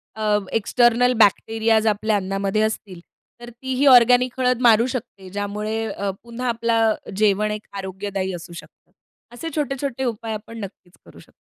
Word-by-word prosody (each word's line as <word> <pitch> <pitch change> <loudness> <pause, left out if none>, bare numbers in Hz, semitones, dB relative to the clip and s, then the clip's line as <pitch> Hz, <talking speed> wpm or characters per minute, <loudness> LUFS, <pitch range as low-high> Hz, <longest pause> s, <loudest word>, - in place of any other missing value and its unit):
अ, 210 -1 +1 0.2
external 240 +2 +3
bacterias 220 +1 +3
आपल्या 215 +1 +1
अन्नामध्ये 195 +2 -1
असतील 215 -4 -3 0.4
तर 240 - -9
तीही 260 +3 -2
ऑर्गेनिक 250 0 +5
हळद 250 -1 +1
मारू 230 -1 +5
शकते 205 -6 -7
ज्यामुळे 210 +3 -3
अ, 200 -1 -3
पुन्हा 235 +2 -5
आपलं 230 -1 +1 0.2
जेवण 210 0 +2
एक 210 0 -6
आरोग्यदायी 190 0 -4
असू 170 0 -10
शकतं. 170 - -14 0.4
असे 325 +7 -6
छोटे-छोटे 275 -3 -2
उपाय 225 -2 -3
आपण 220 +2 -8
नक्कीच 190 -3 -10
करू - - -16
शकतो. - - -19
220 Hz, 145 wpm, -22 LUFS, 205-240 Hz, 0.4 s, ऑर्गेनिक